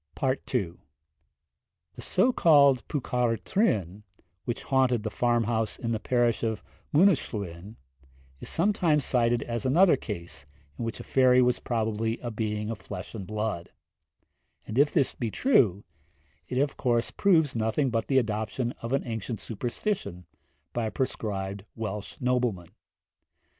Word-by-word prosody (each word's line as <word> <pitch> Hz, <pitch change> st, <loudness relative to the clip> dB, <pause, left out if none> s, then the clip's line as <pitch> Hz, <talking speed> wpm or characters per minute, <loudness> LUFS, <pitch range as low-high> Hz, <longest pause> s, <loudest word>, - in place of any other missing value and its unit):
II. 125 Hz, -8 st, -1 dB, 1.2 s
The -, -, -10 dB
so 245 Hz, +7 st, +2 dB
called 140 Hz, -, +5 dB
Pwca'r 125 Hz, -5 st, 0 dB
Trwyn, 105 Hz, -, 0 dB, 0.4 s
which 120 Hz, -, -3 dB
haunted 130 Hz, -4 st, +2 dB
the 110 Hz, -, -3 dB
farm 120 Hz, 0 st, +1 dB
house 110 Hz, 0 st, -1 dB
in 115 Hz, -, -3 dB
the 110 Hz, -, -1 dB
parish 120 Hz, -1 st, +1 dB
of 110 Hz, -5 st, -2 dB, 0.3 s
Mynyddyslwyn, 105 Hz, -, +1 dB, 0.6 s
is -, -, -8 dB
sometimes 170 Hz, -5 st, +2 dB
cited 120 Hz, -2 st, +2 dB
as 120 Hz, +1 st, -4 dB
another 165 Hz, +6 st, +5 dB
case 85 Hz, -, -7 dB, 0.3 s
in -, -, -2 dB
which 115 Hz, -, -4 dB
a -, -, -7 dB
fairy 130 Hz, -1 st, +4 dB
was 125 Hz, -1 st, +3 dB
probably 110 Hz, -1 st, -1 dB
a 120 Hz, -, -4 dB
being 105 Hz, 0 st, -2 dB
of 110 Hz, -, -6 dB
flesh 90 Hz, -, -8 dB
and 100 Hz, -5 st, -6 dB
blood; 105 Hz, -5 st, -3 dB, 1.0 s
and 110 Hz, +4 st, -2 dB
if 145 Hz, +1 st, +5 dB
this 135 Hz, -, +1 dB
be 115 Hz, -, -3 dB
true, 105 Hz, -, +3 dB, 0.6 s
it 125 Hz, -, -3 dB
of 140 Hz, +1 st, 0 dB
course 120 Hz, -2 st, +1 dB
proves 160 Hz, -9 st, +3 dB
nothing 115 Hz, +5 st, 0 dB
but 115 Hz, -1 st, -1 dB
the 135 Hz, -, +2 dB
adoption 110 Hz, +1 st, -1 dB
of 115 Hz, +2 st, -4 dB
an 135 Hz, -, 0 dB
ancient 115 Hz, -1 st, -4 dB
superstition 120 Hz, -, -3 dB, 0.5 s
by 120 Hz, -2 st, -1 dB
a -, -, -4 dB
proscribed 100 Hz, -5 st, -3 dB
Welsh 105 Hz, -2 st, -5 dB
nobleman. 120 Hz, -9 st, 0 dB
115 Hz, 140 wpm, -27 LUFS, 105-130 Hz, 1.2 s, called